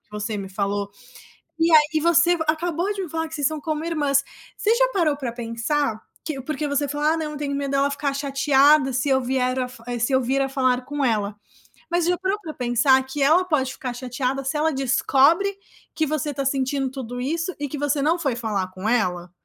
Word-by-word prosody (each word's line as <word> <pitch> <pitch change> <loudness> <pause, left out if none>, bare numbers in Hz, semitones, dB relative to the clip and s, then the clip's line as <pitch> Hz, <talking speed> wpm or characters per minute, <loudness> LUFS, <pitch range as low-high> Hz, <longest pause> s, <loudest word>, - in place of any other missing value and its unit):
que - - -43
você 210 +1 -3
me 195 -1 -6
falou, 200 +1 -2 0.7
e 330 +1 +3
aí, 310 - +9
e - - +4
você 340 +1 +4
acabou 340 +5 0
de 395 - -4
me 340 - -7
falar 320 0 -2
que 320 - -13
vocês 290 -2 +1
são 310 -1 -3
como 310 0 -3
irmãs. 290 -4 +1 0.3
Você 435 +2 +2
já - - +3
parou 315 -7 +1
pra 255 -5 -4
pensar 230 +1 -2 0.2
que 300 -4 -4
porque 305 +2 -3
você 285 0 0
fala: 295 +3 +1
"Ah, - - -1
não, 310 -1 -3
eu 295 - -6
tenho 280 -1 -3
medo 280 -1 -2
dela 275 +1 +2
ficar 280 -1 -2
chateada 275 0 +3
se 255 +3 0
eu 265 0 +4
vier 255 0 0
a - - +1
f 235 -2 -13
eh, 240 -1 -3
se 240 +4 0
eu 260 - +4
vier 265 +3 0
a 270 - -2
falar 255 -2 +1
com 290 0 -3
ela", 210 -3 0 0.6
mas 345 -1 +2
já 355 0 +1
para 380 +3 -1
pra 320 -6 -8
pensar 250 +2 +3
que 275 +2 -5
ela 335 +6 +4
pode 270 -7 0
ficar 250 -2 -5
chateada 255 +2 -3
se 270 +3 -2
ela 315 0 +1
descobre 280 +9 +2 0.4
que 315 -2 0
você 300 0 -1
está 275 0 -3
sentindo 270 0 0
tudo 245 -2 -6
isso 330 +6 -2
e 290 -2 -3
que 295 - -5
você 290 0 0
não 330 +4 +2
foi 270 -7 -1
falar 210 -6 -2
com 190 +4 -4
ela? 180 -7 0
275 Hz, 230 wpm, -23 LUFS, 250-310 Hz, 0.7 s, aí